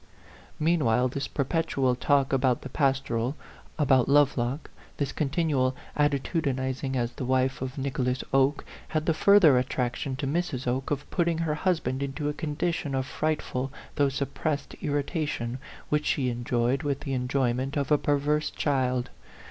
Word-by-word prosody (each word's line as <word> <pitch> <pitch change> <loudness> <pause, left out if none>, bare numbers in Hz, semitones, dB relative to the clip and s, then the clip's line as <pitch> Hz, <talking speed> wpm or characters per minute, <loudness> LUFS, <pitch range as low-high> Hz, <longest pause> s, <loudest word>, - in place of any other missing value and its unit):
Meanwhile 130 -7 +2
this 140 +2 -3
perpetual 140 -3 0
talk 135 +2 +2
about 130 -2 +2
the 135 - -6
pastoral, 135 -2 0 0.4
about 135 -5 +3
Lovelock, 140 -1 +2 0.3
this 145 -2 -1
continual 140 -4 0 0.2
atti 145 -1 +2
tudinizing 130 -3 -2
as 120 -1 0
the - - -6
wife 130 +1 +1
of 130 +1 -4
Nicholas 130 -2 -1
Oke, 135 +1 +3 0.2
had 155 -1 -1
the 165 - +3
further 165 -7 +6
attraction 125 +1 -2
to 140 +2 -3
Mrs. 145 -3 -1
Oke 130 +2 -1
of 145 0 -2
putting 170 -2 +1
her 165 -2 0
husband 150 -6 0
into 140 +2 -2
a - - -2
condition 155 -1 -2
of 130 -1 0
frightful 140 -3 -2 0.2
though 140 -1 +2
suppressed 140 +2 -2
irritation, 145 -4 -2 0.3
which 150 0 +1
she 130 -3 +1
en 120 0 -5
joyed 120 +3 +1
with 140 -1 -2
the 140 -2 -3
enjoyment 130 +1 0
of 140 -1 -1
a 150 - +5
perverse 145 +1 +1
child. 130 -3 0
135 Hz, 150 wpm, -27 LUFS, 130-150 Hz, 0.4 s, further